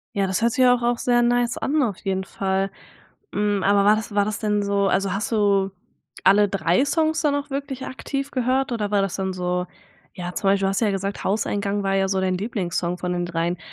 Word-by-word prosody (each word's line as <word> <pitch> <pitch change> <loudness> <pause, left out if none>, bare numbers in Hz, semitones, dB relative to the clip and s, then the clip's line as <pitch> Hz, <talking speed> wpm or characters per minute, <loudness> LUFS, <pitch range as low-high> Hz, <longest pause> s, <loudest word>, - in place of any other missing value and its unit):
Ja, 200 - +2
das 185 +2 -1
hört 235 +1 +3
sich 260 - +3
ja 250 -1 +6
auch 245 - -5
auch 240 0 +1
sehr 240 0 +2
nice 240 0 +1
an 295 +1 +1
auf 210 -7 -2
jeden 190 -2 -2
Fall, 195 0 -2 0.6
hm, 205 -2 0
aber 200 0 +3
war 210 - +6
das 220 -1 -5
war 205 -1 +3
das 215 0 -3
denn 210 -1 0
so 200 0 +1
also 195 -1 +1
hast 200 +2 -2
du 200 -3 +2 0.5
alle 205 +2 +5
3 190 +4 +2
Songs 315 +1 +1
da 300 - +2
noch 285 0 -2
wirklich 275 -1 -4
aktiv 275 +1 -4
gehört 255 0 0
oder 210 -3 -2
war 200 -1 +2
das 195 - -2
dann 190 -1 -2
so 180 0 -2 0.5
ja, 180 -1 -5
zum 195 - -3
Beispiel, 195 0 +3
du - - +2
hast 195 - 0
ja 215 -3 +2
gesagt 195 +1 -3
„Hauseingang“ 205 0 -1
war 195 0 0
ja 195 0 +2
so 190 0 0
dein 185 -1 0
Lieblingssong 180 -4 -2
von 180 0 -2
den 175 0 -1
3. 170 0 -2
200 Hz, 230 wpm, -23 LUFS, 190-240 Hz, 0.6 s, ja